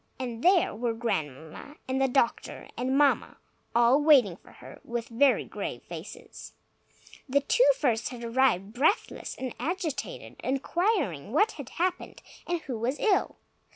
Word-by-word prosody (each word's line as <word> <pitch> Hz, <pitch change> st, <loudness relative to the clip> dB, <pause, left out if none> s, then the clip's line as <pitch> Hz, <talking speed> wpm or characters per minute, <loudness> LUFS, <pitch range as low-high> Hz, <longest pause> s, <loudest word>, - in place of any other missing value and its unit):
And 240 Hz, -2 st, -5 dB
there 365 Hz, 0 st, +4 dB
were 230 Hz, +1 st, -2 dB
Grandmamma 160 Hz, -, -4 dB
and 260 Hz, +1 st, -1 dB
the 270 Hz, -, +4 dB
doctor 245 Hz, -2 st, -1 dB
and 255 Hz, +3 st, 0 dB
Mamma, 290 Hz, -1 st, +2 dB, 0.4 s
all 240 Hz, +4 st, +5 dB
waiting 270 Hz, -, +5 dB
for -, -, -19 dB
her, -, -, -13 dB
with 235 Hz, -1 st, -4 dB
very 255 Hz, +3 st, +3 dB
grave -, -, -6 dB
faces. -, -, -10 dB, 0.8 s
The 280 Hz, +2 st, +3 dB
two -, -, +4 dB
first 235 Hz, -6 st, 0 dB
had 245 Hz, -2 st, -8 dB
arrived, 230 Hz, -5 st, +1 dB
breathless 305 Hz, -, 0 dB
and 260 Hz, -1 st, -5 dB
agitated, 320 Hz, -5 st, -4 dB
inquiring 275 Hz, -, -1 dB
what 420 Hz, +9 st, +3 dB
had 285 Hz, -5 st, -9 dB
happened, 360 Hz, +1 st, -3 dB, 0.2 s
and 345 Hz, -1 st, -1 dB
who 250 Hz, -7 st, -5 dB
was 250 Hz, +5 st, -1 dB
ill. 415 Hz, -4 st, +1 dB
260 Hz, 145 wpm, -28 LUFS, 230-300 Hz, 0.8 s, all